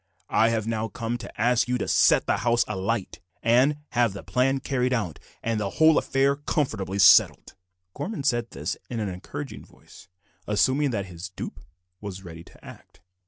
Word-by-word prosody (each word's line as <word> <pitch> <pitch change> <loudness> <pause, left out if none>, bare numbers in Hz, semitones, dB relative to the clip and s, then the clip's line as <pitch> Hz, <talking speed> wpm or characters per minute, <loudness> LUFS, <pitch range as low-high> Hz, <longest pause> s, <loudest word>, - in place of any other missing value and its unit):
"I 115 - +4
have 110 -2 -1
now 110 -1 -2
come 115 +2 -4
to - - -9
ask 120 +2 +2
you 125 0 0
to - - -3
set - - +4
the - - +1
house 120 +1 +2
alight, 100 0 -3 0.2
and 125 +6 +4
have 120 -4 +1
the 100 - -8
plan 135 +2 +1
carried 130 -1 -1
out, 95 - -2 0.2
and 115 -1 -1
the 100 -2 -2
whole 160 -1 +6
affair 135 +1 +1
comfortably 110 -10 -2
settled." 100 - +5 0.4
Gorman 205 -8 -5
said 120 -4 0
this - - -4
in 120 - -4
an 105 -2 -2
encouraging 90 0 -7
voice, - - -18 0.4
assuming 130 +7 +2
that 100 -6 -2
his 90 +1 -8
dupe 95 - -7 0.4
was 95 -2 -7
ready 85 -1 -9
to - - -18
act. - - -14
115 Hz, 175 wpm, -25 LUFS, 100-130 Hz, 0.4 s, whole